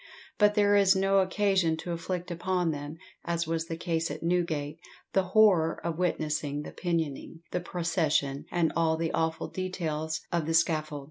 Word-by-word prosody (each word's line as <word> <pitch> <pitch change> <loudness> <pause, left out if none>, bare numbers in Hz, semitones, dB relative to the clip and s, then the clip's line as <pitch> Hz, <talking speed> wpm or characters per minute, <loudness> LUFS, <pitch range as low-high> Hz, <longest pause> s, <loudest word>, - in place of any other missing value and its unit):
But 210 0 +5
there 205 -1 +4
is 195 -1 +5
no 195 +1 +3
occasion 190 -3 +2
to 175 - -5
inflict 175 +1 -4
upon 180 0 0
them, 145 +1 -6 0.3
as 170 0 -1
was 165 0 -2
the 165 - -4
case 165 -1 -1
at - - -6
Newgate, 165 -3 -1 0.3
the 195 - +4
horror 185 -4 +4
of 170 0 -2
witnessing 150 -4 -1
the - - -8
pinioning, 165 -2 -3
the 180 - -1
procession, 160 -5 0
and 170 -2 +1
all 160 -1 +2
the 165 0 -1
awful 160 0 -1
details 160 -4 -3
of 170 -3 0
the 165 - +1
scaffold. 155 -2 +1
165 Hz, 170 wpm, -28 LUFS, 160-185 Hz, 0.3 s, But